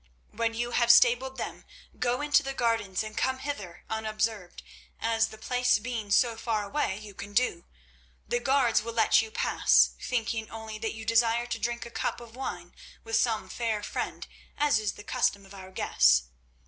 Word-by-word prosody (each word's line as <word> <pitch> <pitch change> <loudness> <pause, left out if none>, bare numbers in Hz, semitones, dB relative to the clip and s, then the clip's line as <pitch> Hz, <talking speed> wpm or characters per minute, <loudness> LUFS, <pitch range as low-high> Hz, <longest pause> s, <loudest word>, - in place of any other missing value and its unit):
When 230 0 -1
you 240 +1 -2
have 240 -1 +2
stabled 245 +2 +4
them - - -5 0.4
go 245 +2 0
into 295 0 +4
the 270 -1 -5
gardens 225 -6 0
and 215 0 -8
come 260 0 0
hither 260 -11 -6
unobserved, 215 -3 -3 0.4
as 225 0 +1
the 220 - -11
place 250 +2 +2
being 225 -1 -5
so 230 +3 +3
far 225 -2 -1
away 200 -3 -1
you 210 -1 -10
can 200 +2 -9
do. 200 -8 +1 0.6
The 240 - 0
guards 260 -3 +3
will 230 +1 -6
let 220 -1 +4
you 225 - -6
pass, - - +3
thinking 225 -2 -2
only 220 -1 -7
that 225 0 -3
you 220 0 -8
desire 230 +1 +3
to 240 - -4
drink 235 0 -2
a 235 - -10
cup - - -2
of 235 -1 -13
wine 175 -9 -6 0.3
with 225 0 -2
some 225 -1 +1
fair 225 -3 -2
friend, - - -4 0.3
as 290 -6 +3
is 210 -2 -2
the 205 - -11
custom 200 -1 0
of 195 - -14
our 190 -1 -10
guests. 65 - +3
225 Hz, 185 wpm, -28 LUFS, 215-240 Hz, 0.6 s, stabled